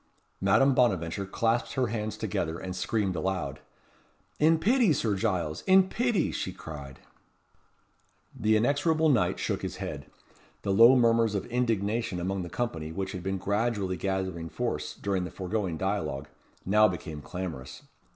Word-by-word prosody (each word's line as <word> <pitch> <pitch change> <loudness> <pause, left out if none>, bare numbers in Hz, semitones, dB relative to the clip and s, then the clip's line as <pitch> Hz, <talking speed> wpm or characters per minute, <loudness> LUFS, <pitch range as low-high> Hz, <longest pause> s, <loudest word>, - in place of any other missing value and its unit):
Madame 115 +8 +4
Bonaventure 100 -6 +1
clasped 115 +4 0
her 130 -2 +1
hands 110 -2 -3
together, 85 -6 -2
and 90 0 -6
screamed 100 -1 -1
aloud. 85 -5 -2 0.8
"In 160 +2 +5
pity, 225 - +3
Sir 115 -6 0
Giles! 90 -7 -1
In 190 0 +6
pity!" 240 -4 +1
she - - -3
cried. 70 -4 -9 1.3
The 110 0 +2
inexorable 155 +7 +2
knight 125 -6 +2
shook - - -2
his - - -4
head. - - -6 0.6
The 100 - 0
low 115 +6 +8
murmurs 115 -3 +3
of 100 - -2
indignation 115 -4 0
among 95 +2 -2
the 85 - -6
company 80 -11 -3
which 95 +2 -3
had 95 - -5
been 95 +2 -2
gradually 100 -1 -1
gathering 95 -3 -3
force - - -3
during 95 -2 -1
the 90 - -4
foregoing 95 -3 -3
dialogue, 80 -7 -2 0.4
now 105 +3 +5
became 80 -5 -5
clamorous. 85 -7 -6
100 Hz, 145 wpm, -28 LUFS, 90-115 Hz, 1.3 s, low